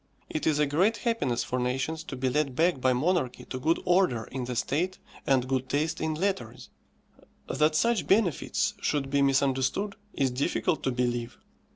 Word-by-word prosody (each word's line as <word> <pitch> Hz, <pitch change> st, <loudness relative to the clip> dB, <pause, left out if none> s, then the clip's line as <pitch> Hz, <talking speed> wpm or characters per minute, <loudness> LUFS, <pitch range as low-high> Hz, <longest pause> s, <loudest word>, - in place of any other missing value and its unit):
It 155 Hz, -, -2 dB
is 155 Hz, -2 st, +3 dB
a 150 Hz, -, +3 dB
great 185 Hz, +11 st, +2 dB
happiness 180 Hz, -, 0 dB
for 125 Hz, -, -2 dB
nations 135 Hz, +6 st, -2 dB
to 135 Hz, -, -6 dB
be 130 Hz, +1 st, -1 dB
led 135 Hz, 0 st, 0 dB
back 165 Hz, -3 st, +2 dB
by 130 Hz, -, +3 dB
monarchy 130 Hz, 0 st, 0 dB
to 130 Hz, -, -5 dB
good 160 Hz, +6 st, +1 dB
order 175 Hz, -11 st, +3 dB
in 125 Hz, +2 st, -5 dB
the 125 Hz, 0 st, -4 dB
state 170 Hz, +10 st, -1 dB, 0.3 s
and 130 Hz, -2 st, +3 dB
good 130 Hz, 0 st, -1 dB
taste 155 Hz, +4 st, -1 dB
in 160 Hz, 0 st, -1 dB
letters. 165 Hz, -, -3 dB, 0.8 s
That 155 Hz, 0 st, +2 dB
such 230 Hz, +2 st, +2 dB
benefits 195 Hz, -6 st, +1 dB
should 135 Hz, -2 st, -1 dB
be 140 Hz, 0 st, +3 dB
misunderstood 135 Hz, +8 st, +1 dB, 0.2 s
is 135 Hz, -2 st, +1 dB
difficult 145 Hz, +5 st, 0 dB
to 130 Hz, -, +2 dB
believe. 120 Hz, -1 st, -2 dB
140 Hz, 175 wpm, -28 LUFS, 130-165 Hz, 0.8 s, is